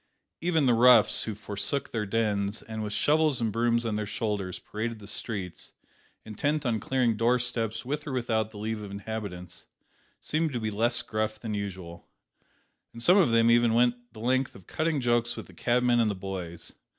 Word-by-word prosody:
Even 165 -3 +1
the 125 - +4
roughs 120 -1 +6
who 110 - -4
forsook 105 +6 -2
their 105 -3 -2
dens, 105 -1 0
and, 110 -1 -6
with 105 -1 -4
shovels 150 +3 +2
and 115 -2 0
brooms 115 +1 +1
on 110 -2 -1
their 105 -1 -3
shoulders, 105 -3 -2
paraded 110 +2 -5
the 105 - -12
streets, 100 -4 -5 0.5
intent 145 +8 -1
on 115 -3 +1
clearing 125 -3 +1
door 115 +3 +3
steps 115 -3 -2
with 150 +3 -3
or - - -3
without 115 -4 0
the 110 - -12
leave 110 +1 -3
of 105 - -7
inhabitants 100 -4 -6 0.5
seemed 155 -1 -1
to 120 - -1
be 110 -1 -2
less 120 +3 +1
gruff 110 -1 -2
than 110 -1 -4
usual, 95 -4 -6 0.9
and 115 - -6
some 180 +7 +6
of 185 -10 +5
them 115 0 +4
even 120 -1 +4
went 120 0 +1
the 110 - -13
length 130 +3 0
of 95 - -14
cutting 155 -2 -1
jokes 120 -1 +1
with - - -6
the - - -16
cabmen 120 0 +2
and 115 -2 +3
the 100 - -2
boys. 95 -3 -6
115 Hz, 190 wpm, -28 LUFS, 105-125 Hz, 0.9 s, roughs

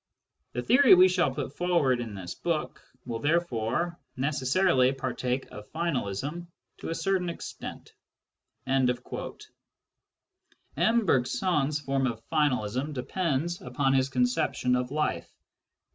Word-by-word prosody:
The 125 - -2
theory 255 -1 +7
we 180 +1 +7
shall 180 -5 +2
put 130 +1 -5
forward 155 -8 +2
in 110 -4 -6
this 90 -2 -6
book 165 -3 -3 0.2
will 115 -2 -4
therefore 170 +2 0 0.2
necessarily 135 0 +2
partake 130 -1 -2
of 105 0 -11
finalism 155 - -2 0.3
to - - -6
a 165 - -2
certain 190 -1 0
extent." 170 - -8 0.7
M. 130 -1 +2 2.2
Bergson's 150 - +1
form 135 -1 0
of 115 -2 -6
finalism 135 -2 0
depends 165 +4 -1
upon 135 +2 0
his 135 0 +2
con 125 -2 +2
ception 125 0 +1
of 125 0 -1
life. 150 +2 -2
135 Hz, 115 wpm, -28 LUFS, 125-170 Hz, 2.2 s, theory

